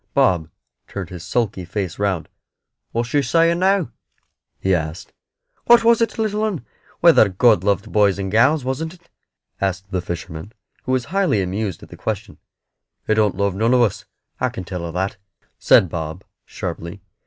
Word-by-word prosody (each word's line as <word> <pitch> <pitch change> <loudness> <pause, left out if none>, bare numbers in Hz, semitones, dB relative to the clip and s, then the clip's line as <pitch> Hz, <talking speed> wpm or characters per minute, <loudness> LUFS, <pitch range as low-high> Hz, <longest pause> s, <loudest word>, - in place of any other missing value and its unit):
Bob 90 - +3 0.4
turned 95 -3 -6
his 90 -2 -8
sulky 100 0 -1
face 90 0 -4
round. 100 -5 -1 0.6
"What's 115 0 -2
she 145 +3 +2
saying 165 +5 +2
now?" 190 -2 +2 0.7
he 95 - +1
asked. 80 +1 -3 0.5
"What 240 -1 +7
was, 230 0 +4
it 230 - 0
little 215 -1 0
'un 190 - -2 0.4
whether 165 -11 +6
God 95 0 +4
loved 100 +1 0
boys 100 -2 +3
and 95 -1 -3
gals, 130 +6 +3
wasn't 160 +6 -3
it?" 175 -1 -27 0.5
asked 95 0 -2
the 90 - -1
fisherman, 85 +2 -7 0.3
who 130 - -2
was 130 -2 0
highly 195 - +2
amused 95 0 -3
at - - -13
the - - -11
question. - - -4 0.7
"He - - +2
don't 105 -3 +2
love 100 -1 +1
none 115 +6 +2
of 125 - +4
us, 105 -1 -1 0.3
I 130 - +1
can 115 -6 -7
tell 90 -1 -5
her 85 - -5
that," 95 +3 -2 0.4
said 95 - +5
Bob, 80 +1 -5 0.2
sharply. 85 +4 -6
105 Hz, 170 wpm, -21 LUFS, 90-135 Hz, 0.7 s, What